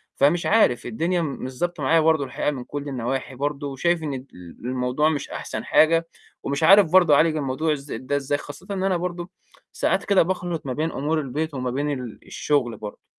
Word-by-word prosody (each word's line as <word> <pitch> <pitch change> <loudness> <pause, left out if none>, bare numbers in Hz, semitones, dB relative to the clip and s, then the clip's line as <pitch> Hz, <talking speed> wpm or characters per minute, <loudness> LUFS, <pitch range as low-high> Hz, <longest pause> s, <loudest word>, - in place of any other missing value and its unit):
فمش 155 +6 +3
عارف، 210 - +3
الدنيا 170 +9 0
م - - -1 0.2
مش 130 0 -7
ضابطة 175 -4 -2
معايا 165 +4 +4
برضه 160 -2 +3
الحقيقة 130 +3 -1
من 130 -3 -6
كُلّ 145 +1 -6
النواحي 130 +1 -3
برضه، 145 +1 -2
وشايف 160 +5 0
إن 145 -2 -3
ال 130 0 -6 0.3
الموضوع 125 +5 0
مش 145 -3 -3
أحسن - - -5
حاجة 165 +1 +4 0.4
ومش 140 +3 -2
عارف 190 -1 +7
برضه 175 -5 +6
أعالج 155 +1 +3
الموضوع 150 +3 0
ازا 140 -4 -6
ده 130 +3 -3
إزاي، 145 0 0
خاصةً 145 +6 -10
إن 190 -1 -2
أنا 190 -2 +2
برضه 175 0 -4 0.4
ساعات - - 0
كده 200 -2 +4
باخلِط 175 -3 -3
ما 130 - -2
بين 160 +4 -1
أمور 155 +3 -1
البيت 150 +3 -3
وما 130 -2 -2
بين 145 +3 -1
ال 125 -5 -5
الشغل 125 -7 0
برضه. 105 -1 -9
145 Hz, 200 wpm, -23 LUFS, 130-165 Hz, 0.4 s, عارف